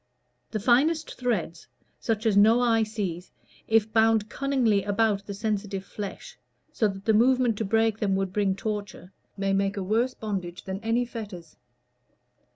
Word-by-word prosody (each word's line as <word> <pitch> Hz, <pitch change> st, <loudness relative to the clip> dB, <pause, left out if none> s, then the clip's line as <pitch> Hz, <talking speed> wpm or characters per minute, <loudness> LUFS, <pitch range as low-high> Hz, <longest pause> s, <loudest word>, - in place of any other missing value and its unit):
The 215 Hz, -, -3 dB
finest 285 Hz, +9 st, +2 dB
threads, 205 Hz, -10 st, -3 dB, 0.3 s
such 225 Hz, -1 st, -2 dB
as 220 Hz, -3 st, +3 dB
no 220 Hz, +4 st, +6 dB
eye 230 Hz, -2 st, +3 dB
sees, 200 Hz, -5 st, -4 dB, 0.4 s
if 220 Hz, -1 st, +2 dB
bound 220 Hz, -1 st, +3 dB
cunningly 255 Hz, -8 st, +1 dB
about 205 Hz, -1 st, +1 dB
the 200 Hz, -, -5 dB
sensitive 205 Hz, -2 st, -3 dB
flesh, 200 Hz, -2 st, -8 dB, 0.3 s
so 220 Hz, -, +2 dB
that 195 Hz, 0 st, -7 dB
the 220 Hz, -, +3 dB
movement 245 Hz, +1 st, +3 dB
to 220 Hz, -, -1 dB
break 225 Hz, +1 st, +1 dB
them 195 Hz, -2 st, +1 dB
would 190 Hz, -1 st, -2 dB
bring 200 Hz, -2 st, +1 dB
torture, 205 Hz, -3 st, -5 dB, 0.3 s
may 195 Hz, 0 st, 0 dB
make 195 Hz, +1 st, 0 dB
a 195 Hz, -, -2 dB
worse 230 Hz, +6 st, 0 dB
bondage 190 Hz, -5 st, -5 dB
than 190 Hz, 0 st, -5 dB
any 225 Hz, +3 st, 0 dB
fetters. 205 Hz, -9 st, -8 dB
215 Hz, 160 wpm, -26 LUFS, 195-225 Hz, 0.4 s, no